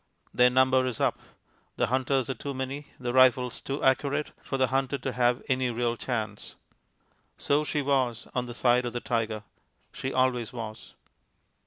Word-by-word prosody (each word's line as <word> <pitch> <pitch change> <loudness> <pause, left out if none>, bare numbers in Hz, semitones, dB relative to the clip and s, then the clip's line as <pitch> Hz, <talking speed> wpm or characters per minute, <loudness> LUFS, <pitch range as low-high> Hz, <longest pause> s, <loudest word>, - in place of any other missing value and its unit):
Their 125 0 +5
number 130 +1 +4
is 125 - -3
up. - - +1 0.6
The - - +1
hunters 130 0 +1
are 135 - -1
too 140 +3 -6
many, 135 +2 -4
the 120 -1 -3
rifles 130 -1 +4
too 140 +2 -4
accurate, 140 +3 +1
for 135 - -3
the 130 -1 +2
hunted 135 0 -1
to 130 - -1
have 125 0 +1
any 130 -1 +1
real 120 0 0
chance. 110 -4 -4 0.8
So 145 +2 +1
she 150 -1 -1
was 130 -4 0
on 125 -1 -1
the 120 - -7
side 125 0 +3
of 120 - -5
the 120 - -2
tiger; 110 -3 -2 0.5
she 130 - -4
always 130 -3 +1
was. 110 -3 -8
130 Hz, 170 wpm, -28 LUFS, 120-135 Hz, 0.8 s, Their